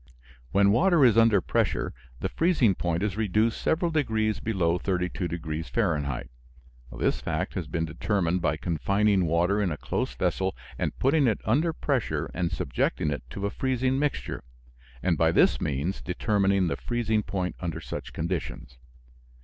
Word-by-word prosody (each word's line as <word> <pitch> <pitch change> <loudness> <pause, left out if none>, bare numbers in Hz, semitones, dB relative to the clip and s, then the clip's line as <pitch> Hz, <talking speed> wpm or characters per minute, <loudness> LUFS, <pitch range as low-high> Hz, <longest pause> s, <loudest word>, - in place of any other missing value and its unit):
When 100 0 +4
water 170 - +4
is 115 -4 +5
under 115 -4 +5
pressure - - 0 0.3
the - - -1
freezing 160 - +3
point 85 0 -1
is 105 -1 -1
reduced 110 +1 +1
several 165 +1 +1
degrees 110 -8 0
below 90 -6 0
32 90 -1 -1
degrees 80 -2 -4
Fahrenheit. 75 - -1 0.6
This - - -1
fact - - -2
has - - -4
been 80 -1 -1
determined 90 +1 0
by 80 -2 +1
confining 100 +4 +1
water 90 +6 +2
in 95 -4 0
a 75 - -3
close - - -3
vessel - - 0 0.2
and - - -2
putting 140 +1 +3
it 110 - +1
under 150 +10 +2
pressure 140 -6 -1
and 85 -1 -1
subjecting 65 +4 -1
it 70 - -3
to 100 +9 -4
a 100 - -1
freezing 130 +1 0
mixture, 145 0 -2 0.6
and 90 -3 +1
by 80 0 +4
this - - +3
means 75 +7 -2
determining 100 0 +1
the 85 - -1
freezing 115 -3 0
point 95 -3 -3
under 85 -3 -3
such - - -6
conditions. 80 -6 -4
100 Hz, 155 wpm, -27 LUFS, 85-115 Hz, 0.6 s, is